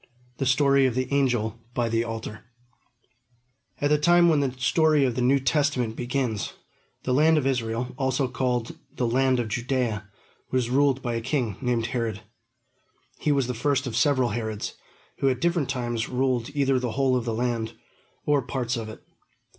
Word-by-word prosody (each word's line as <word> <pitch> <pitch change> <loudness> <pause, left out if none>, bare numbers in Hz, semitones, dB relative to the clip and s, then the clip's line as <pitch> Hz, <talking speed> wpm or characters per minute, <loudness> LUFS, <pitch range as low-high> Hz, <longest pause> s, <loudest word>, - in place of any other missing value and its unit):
THE 135 - 0
STORY 140 0 +4
OF 120 - -2
THE 130 +1 -2
ANGEL 120 -5 +1 0.2
BY 120 -2 0
THE 115 0 +1
ALTAR 110 -1 -6 1.3
At 145 +1 +1
the 150 - +4
time 175 +2 +5
when 155 -3 +3
the 140 -2 0
story 145 +3 +3
of 125 - 0
the 125 - -2
New 130 +3 +4
Testament 130 -3 0
begins, 125 -4 -2 0.5
the 125 - 0
land 155 +4 +4
of 145 - 0
Israel, 125 -2 -1
called - - -20
also 130 -2 0 0.2
the 125 - 0
land 130 +1 +2
of 120 - -1
Judea, 120 -2 -2 0.4
was 125 -2 0
ruled 135 0 +2
by 120 -2 -1
a 115 - -2
king 125 -4 -1
named 120 -3 0
Herod. 115 -3 -2 1.0
He 150 - +1
was 140 -2 +2
the 125 - -3
first 140 +3 0
of 120 -4 -4
several 130 -2 +3
Herods, 110 -2 -3 0.5
who 135 - +3
at 130 -2 -1
different 170 -4 0
times 120 -3 -2
ruled 125 -2 0
either 135 -2 +2
the 125 -3 -3
whole 135 0 +2
of 125 -2 -1
the 115 -2 -1
land, 115 -1 -1 0.5
or 145 -1 +3
parts 125 -1 -2
of 115 -2 -5
it. 110 - -11
125 Hz, 180 wpm, -25 LUFS, 115-135 Hz, 1.3 s, time